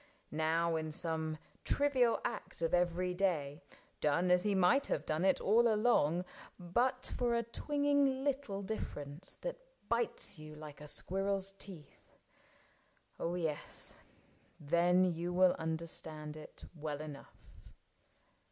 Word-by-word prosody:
Now 160 +2 +1
in 155 0 -3
some 160 -1 0 0.3
trivial 260 -5 +3
act - - -3
of 165 - +1
every 180 +1 +2
day. 170 -5 0 0.4
Done 170 +5 +2
as 180 0 +6
he 205 +1 +1
might 190 +9 +4
have - - -1
done 155 +2 0
it 190 0 +4
all 230 +3 +4
along 185 -7 +3 0.3
But 240 +9 0
for 240 -1 +1
a 235 - +1
twinging 285 +2 +1
little 270 -8 -1
difference 155 -6 -5
That - - -4 0.3
bites 235 -6 -1
you 155 0 -9
like 150 -1 -10
a 150 - -8
squirrel's 195 +4 -1
teeth 190 -6 -10 0.6
— - - -35
oh, 170 +1 -1
yes, 160 -4 -3 0.6
Then 175 +4 +4
you 175 0 -1
will 185 0 +5
understand 160 -2 -4
it 155 - -11
well 150 -3 -4
enough. 150 -2 -10
180 Hz, 130 wpm, -35 LUFS, 155-215 Hz, 0.6 s, as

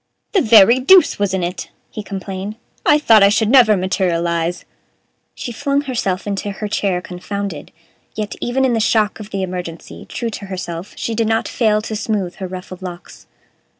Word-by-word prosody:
"The 390 - +3
very 225 -1 +6
deuce 345 - +5
was 205 -2 +1
in 190 -2 -1
it!" 175 +2 -4 0.2
he 215 - -6
complained; 195 0 -6 0.3
"I 295 - +6
thought 225 -8 +5
I 200 - +7
should 215 +1 +2
never 235 -5 +6
materialize." 175 -2 -1 0.7
She 245 - -5
flung 280 +4 0
herself 230 -9 -2
into 205 0 -3
her 210 +2 -5
chair, 195 -3 -1
confounded; 185 -2 -6 0.4
yet, 210 -1 -3
even 265 +2 +1
in 255 - +2
the 225 - +1
shock 215 -1 +1
of 210 -1 -9
the 195 -2 -3
emergency, 180 -3 -7
true 235 -2 -3
to 205 - -7
herself, 180 -1 -6
she 230 - -3
did 225 0 0
not 225 0 0
fail 215 -3 +1
to 220 - -4
smooth 210 -4 -2
her 190 -2 -5
ruffled 185 0 -8
locks. 175 -2 -9
205 Hz, 180 wpm, -18 LUFS, 185-225 Hz, 0.7 s, I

